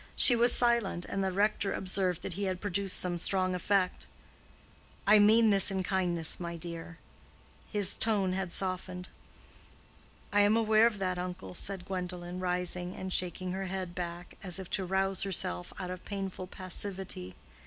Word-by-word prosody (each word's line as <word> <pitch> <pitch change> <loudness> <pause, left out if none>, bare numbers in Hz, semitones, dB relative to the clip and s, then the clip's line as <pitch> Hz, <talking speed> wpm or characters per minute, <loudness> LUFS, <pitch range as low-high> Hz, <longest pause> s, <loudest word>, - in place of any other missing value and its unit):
She 245 - +6
was 240 +1 +6
silent, 235 -8 +4
and 195 - -3
the 190 - 0
rector 200 +1 0
observed 185 -2 0
that - - -4
he 200 +3 -3
had 185 -1 -2
produced 200 -1 -1
some 175 -1 -1
strong 185 +1 0
effect. 185 +1 0 1.0
"I 210 +1 +6
mean 220 +2 +5
this 195 0 +5
in 190 -1 -2
kindness, 175 -4 0
my 170 -1 -5
dear." 165 0 -8 0.7
His 205 -3 +5
tone 200 -5 +2
had 190 -2 -3
softened. 185 -1 -3 1.2
"I 205 - +5
am 205 +2 +4
aware 220 0 +4
of 225 -3 -3
that, 185 -2 -2
uncle," 180 0 -6
said 190 0 0
Gwendolen, 180 -1 -5
rising 180 0 -2
and 185 0 -5
shaking 180 0 -2
her 190 +1 -4
head 185 -1 -4
back, 175 0 -6
as 185 -3 +2
if 190 -2 -8
to 190 - 0
rouse 190 +1 0
herself 90 - -2
out 180 -1 -4
of 185 0 -8
painful 195 -2 -5
passivity. 185 - -3
185 Hz, 165 wpm, -30 LUFS, 180-195 Hz, 1.2 s, She